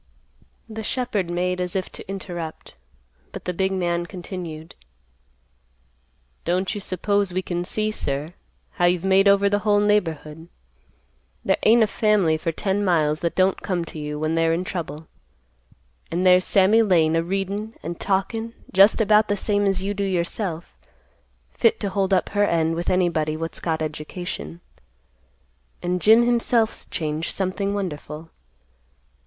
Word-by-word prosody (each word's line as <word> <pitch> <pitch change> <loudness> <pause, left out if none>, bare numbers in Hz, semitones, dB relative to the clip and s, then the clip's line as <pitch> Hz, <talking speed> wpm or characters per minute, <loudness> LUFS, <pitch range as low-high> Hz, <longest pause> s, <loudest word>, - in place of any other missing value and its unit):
The 220 -1 -6
shepherd 215 -5 -2
made 180 +1 -1
as 180 +1 -3
if 190 -1 -2
to - - -10
interrupt, 175 -5 -6 0.6
but - - -9
the 180 - -2
big 190 +2 0
man 175 -2 -1
continued; 175 -4 -7 1.7
"Don't 180 +2 0
you 205 - -5
suppose 200 +1 0
we 185 +1 -2
can 175 -1 -3
see, 215 +4 -1
sir, 145 -4 -2 0.4
how 175 - 0
you've 175 0 +2
made 190 +1 +4
over 200 0 +5
the 205 +1 +1
whole 205 0 +2
neighborhood. 165 -6 0 1.0
There - - +2
ain't 230 +1 +5
a - - +5
family 210 -6 +2
for 165 +2 -2
ten 195 +4 -1
miles 155 -5 +2
that 170 - -2
don't 185 0 +2
come 180 -3 -2
to 155 - -8
you 150 0 -4
when 155 +1 -1
they're 165 0 +2
in 170 +2 -1
trouble. 160 -4 -5 1.0
An' 175 +2 -1
there's 185 0 +5
Sammy 200 +4 +4
Lane 165 -7 +3
a 165 - +3
readin', 195 +5 -3
an' - - -3
talkin' 205 +6 -2 0.2
just 195 +4 +6
about 215 0 +4
the 205 - 0
same 205 0 +1
as 190 -1 0
you 200 +1 -1
do 200 0 -2
yourself, 175 -2 -3 0.8
fit 460 -1 +2
to 200 - -2
hold 195 0 0
up 185 - +2
her 205 0 +1
end 165 -1 +1
with 170 +1 -2
anybody 160 -4 +1
what's 165 +1 -5
got 160 -2 -1
education, 150 - -6 1.2
and 180 0 -1
Jim 225 +2 +6
himself's 235 -2 +1
changed 155 0 -3
something 195 +1 -1
wonderful. 160 -4 -5
185 Hz, 155 wpm, -23 LUFS, 165-205 Hz, 1.7 s, just